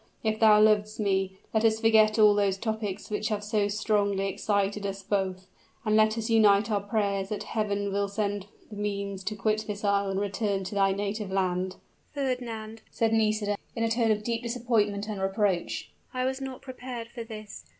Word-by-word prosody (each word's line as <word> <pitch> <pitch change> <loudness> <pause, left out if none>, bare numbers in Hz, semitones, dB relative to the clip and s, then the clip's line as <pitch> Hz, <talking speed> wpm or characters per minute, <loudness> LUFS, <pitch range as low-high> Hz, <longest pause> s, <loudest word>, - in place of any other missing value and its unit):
If 220 -1 0
thou 215 -2 +7
lovest 215 0 +3
me, 190 -2 0 0.2
let 220 0 +2
us 220 -1 +3
forget 220 -1 +5
all 210 -1 +7
those 200 -2 +1
topics 215 -2 -4
which 210 +1 -1
have 210 -2 -2
so 210 -1 +1
strongly 205 -1 +1
excited 200 0 0
us 195 0 -4
both: 190 -2 -1 0.4
and 215 0 +2
let 215 +1 +4
us 225 -1 -2
unite 215 -1 +4
our 205 -1 +1
prayers 200 -2 -1
that 210 - -3
Heaven 205 -2 -2
will 200 0 +1
send 200 -1 -2 0.2
thee 210 - -8
means 200 -2 -3
to 215 - -2
quit 215 +1 0
this 210 0 -5
isle 200 -1 +2
and 195 0 -1
return 200 -1 -1
to 185 - -6
thy 195 -1 +3
native 200 +1 -3
land." 185 -1 0 0.4
"Fernand," 235 -5 -3
said 225 -1 0
Nisida, 215 -2 +1 0.2
in 230 - -1
a 225 - +1
tone 230 -1 +2
of 215 -1 +1
deep 230 +1 -1
disappointment 230 -4 0
and 210 -3 -4
reproach, 195 -2 -1 0.2
"I 255 0 0
was 265 +1 -2
not 265 -1 -6
prepared 250 -3 -7
for 235 -1 -7
this. 215 - -9
210 Hz, 190 wpm, -28 LUFS, 200-220 Hz, 0.4 s, thou